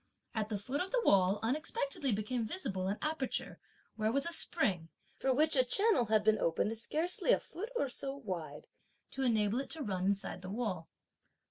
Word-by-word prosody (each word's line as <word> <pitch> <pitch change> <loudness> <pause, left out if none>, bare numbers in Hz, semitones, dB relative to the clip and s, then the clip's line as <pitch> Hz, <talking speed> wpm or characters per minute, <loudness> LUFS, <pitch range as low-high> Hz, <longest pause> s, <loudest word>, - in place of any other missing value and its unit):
At 215 -2 -2
the 210 - -1
foot 255 +8 -3
of 375 - -3
the - - 0
wall, 190 +1 +4
unexpectedly 275 +1 -1
became 215 +4 -1
visible 215 - -3
an 200 +2 -1
aperture 305 -4 -3 0.4
where 215 0 +1
was 275 +3 +1
a 340 - 0
spring, 185 - +2 0.3
for 265 - 0
which 305 +4 +3
a 255 - +5
channel 395 - +3
had 215 -1 +2
been 215 0 +3
opened 170 +7 0
scarcely 320 - +1
a - - +5
foot 425 +6 -7
or 285 - +1
so 270 +2 -1
wide, 170 - -6 0.5
to 270 - -5
enable 220 -2 +2
it 275 - -5
to 320 -2 -4
run 190 -4 -1
inside 195 -2 -2
the 185 - -7
wall. 195 -6 -3
230 Hz, 190 wpm, -33 LUFS, 200-280 Hz, 0.5 s, a